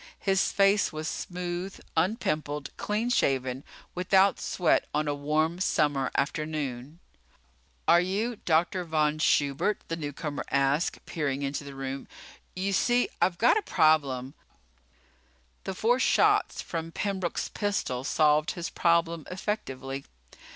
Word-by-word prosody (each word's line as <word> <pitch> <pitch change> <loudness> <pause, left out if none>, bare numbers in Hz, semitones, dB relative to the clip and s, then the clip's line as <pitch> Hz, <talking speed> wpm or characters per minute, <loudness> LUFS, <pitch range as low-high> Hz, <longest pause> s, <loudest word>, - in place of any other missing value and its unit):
His 195 -2 +1
face 200 +1 +3
was 155 0 -5
smooth, 180 +2 -4 0.2
unpimpled, 155 - -1
clean 220 +4 -1
shaven, 130 - +1 0.3
without 190 +2 +3
sweat 175 -3 +1
on 150 0 +1
a 145 - +1
warm 155 +4 0
summer 145 -7 +1
afternoon. 150 -2 -2 0.9
"Are 170 +1 +6
you 210 +6 -1
Dr. 175 +2 +1
Von 155 -2 0
Schubert?" 145 +7 +1
the 165 - -1
newcomer 150 -1 -4
asked, 140 +4 +1
peering 145 -4 -2
into 140 +1 -3
the 140 -1 -9
room. 135 0 -5 0.5
"You 195 +2 -1
see, 245 +5 +2
I've 175 0 +2
got 240 - +4
a - - -6
problem 145 - +2 0.7
" 65 -1 -37
The 190 - -4
four 240 +6 +2
shots - - +3
from 165 -1 -5
Pembroke's 190 -2 -2
pistol 200 - -2
solved 150 +2 +2
his 175 -2 -5
problem 170 -1 +1
effectively. 140 -9 -4
160 Hz, 125 wpm, -28 LUFS, 140-185 Hz, 0.9 s, Are